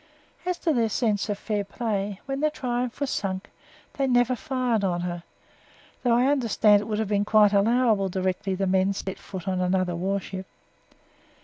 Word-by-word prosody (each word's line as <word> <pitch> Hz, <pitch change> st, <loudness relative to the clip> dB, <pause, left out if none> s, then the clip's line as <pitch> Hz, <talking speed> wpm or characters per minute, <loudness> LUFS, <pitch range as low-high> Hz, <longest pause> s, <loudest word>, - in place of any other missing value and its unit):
As 360 Hz, -1 st, 0 dB
to 325 Hz, -, 0 dB
their 230 Hz, -4 st, +2 dB
sense 215 Hz, -2 st, 0 dB
of 205 Hz, -, -1 dB
fair 205 Hz, -1 st, -2 dB
play, 200 Hz, -2 st, -3 dB
when 270 Hz, 0 st, -3 dB
the 305 Hz, +1 st, +2 dB
Triumph 250 Hz, -4 st, -3 dB
was 280 Hz, -2 st, -1 dB
sunk, 190 Hz, 0 st, -3 dB, 0.5 s
they 275 Hz, -1 st, +1 dB
never 245 Hz, 0 st, +3 dB
fired 245 Hz, -3 st, -1 dB
on 175 Hz, -2 st, 0 dB
her 175 Hz, -1 st, -4 dB, 0.8 s
though 240 Hz, -2 st, +3 dB
I 245 Hz, +2 st, +3 dB
understand 225 Hz, -6 st, +4 dB
it -, -, -6 dB
would 215 Hz, -1 st, -2 dB
have 220 Hz, -1 st, -1 dB
been 205 Hz, 0 st, +1 dB
quite 210 Hz, -1 st, +4 dB
allowable 215 Hz, -1 st, +3 dB
directly 185 Hz, +1 st, -1 dB
the 195 Hz, +1 st, -1 dB
men 190 Hz, +1 st, +2 dB
set 190 Hz, 0 st, -5 dB
foot 190 Hz, -2 st, -8 dB
on 185 Hz, -1 st, 0 dB
another 180 Hz, -1 st, +1 dB
warship. 190 Hz, +1 st, -3 dB
205 Hz, 180 wpm, -26 LUFS, 190-245 Hz, 0.8 s, understand